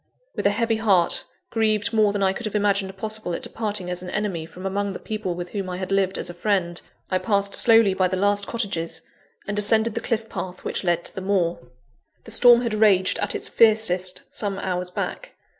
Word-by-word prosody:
With - - +1
a - - +4
heavy 225 +2 0
heart, 195 -6 +2 0.3
grieved 215 -1 +1
more 215 -2 +4
than 200 -1 -1
I 190 0 +3
could 225 +3 -4
have 215 - -6
imagined 200 -2 0
possible 215 -3 -3
at - - -7
departing 210 -4 -3
as 180 - -3
an 180 - -7
enemy 185 -6 -3
from 185 +3 -11
among 200 +1 -2
the - - -7
people 215 -5 -4
with 175 0 -6
whom 195 -3 -4
I 180 - -4
had 185 +1 -5
lived 195 -1 +1
as - - -4
a 175 - -6
friend, 175 -2 -1 0.3
I 185 - +2
passed 200 -2 +1
slowly 225 -4 +5
by 185 -1 +2
the 185 +1 -2
last 205 +1 +1
cottages, 165 -8 -3 0.4
and 205 +1 -2
ascended 220 +2 +2
the 230 - -3
cliff 225 -1 -2
path 185 -2 -6
which - - -3
led 175 -1 0
to - - -3
the 190 - -6
moor. 185 -3 0 0.6
The 225 - -9
storm 240 +1 +6
had 235 -3 -2
raged 205 -4 +3
at - - -1
its - - -2
fiercest 200 -5 +3
some 200 -2 -3
hours 180 -2 -3
back. - - -5
200 Hz, 215 wpm, -23 LUFS, 185-215 Hz, 0.6 s, storm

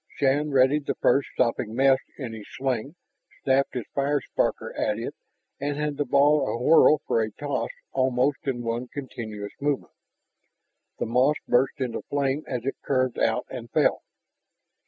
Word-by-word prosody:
Shann 145 +2 +2
readied 140 +2 +3
the - - 0
first 140 - +2
sopping 115 -1 0
mess 135 +1 +5 0.2
in 125 -6 -5
his 110 -2 -9
sling, 130 +2 -2 0.5
snapped 135 0 +2
his 120 -4 -3
fire 140 +1 +1
sparker - - -2
at 105 -1 0
it, 115 - -4 0.5
and 145 +1 -2
had 150 -1 -2
the 145 - 0
ball 145 +3 +4
awhirl 150 +4 +5
for 115 - +1
a 110 - -1
toss 145 +6 -3 0.2
almost 130 +2 +1
in 120 -3 -1
one 115 +2 -2
continuous 110 -7 -6
movement. 145 -1 -1 1.0
The - - -2
moss 125 +6 +3
burst 130 +3 +2
into 130 -3 -2
fire 140 0 0
as 125 -2 -4
it 135 - -2
curved 130 -2 0
out 115 +2 +1
and 120 -3 -7
fell. - - +2
130 Hz, 155 wpm, -26 LUFS, 120-145 Hz, 1.0 s, mess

